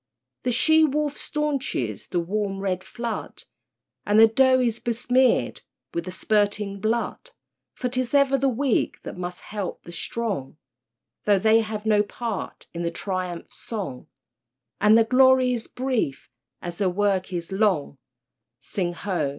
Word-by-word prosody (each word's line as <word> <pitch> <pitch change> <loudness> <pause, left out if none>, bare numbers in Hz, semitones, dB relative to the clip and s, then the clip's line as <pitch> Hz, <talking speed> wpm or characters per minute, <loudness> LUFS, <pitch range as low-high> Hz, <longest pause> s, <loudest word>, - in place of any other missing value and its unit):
The 250 - 0
she 315 +6 +5
wolf 295 -1 +1
staunches 275 - -2
the 175 - 0
warm 195 +2 -2
red 185 -1 -2
flood, 235 -2 -5 0.6
And 205 +1 +3
the 225 - +10
doe 260 +3 +4
is 235 -2 0
besmeared 245 +2 +2 0.3
with 170 0 -2
the 185 - -5
spurting 205 0 0
blood, 230 - -2 0.5
For 250 - -2
'tis 255 +1 -1
ever 280 -1 +4
the 270 0 +2
weak 260 -1 0
that - - -7
must 180 0 -6
help 205 -3 -5
the 170 - -10
strong, 185 - -3 0.7
Though 205 -1 +5
they 220 +3 +4
have 215 -1 -3
no 210 -1 +4
part 215 0 -5
in 170 - -4
the 170 - 0
triumph 180 -1 -4
song, 190 - -6 0.7
And 210 +2 +6
their 225 - +5
glory 255 +1 +5
is 235 -2 -3
brief 245 - -2 0.3
as 175 -1 -5
their 195 -3 +2
work 190 0 0
is 175 0 -4
long— 190 -9 +1 0.6
(Sing 175 -3 -2
ho! 175 -5 -1
215 Hz, 150 wpm, -25 LUFS, 185-250 Hz, 0.7 s, the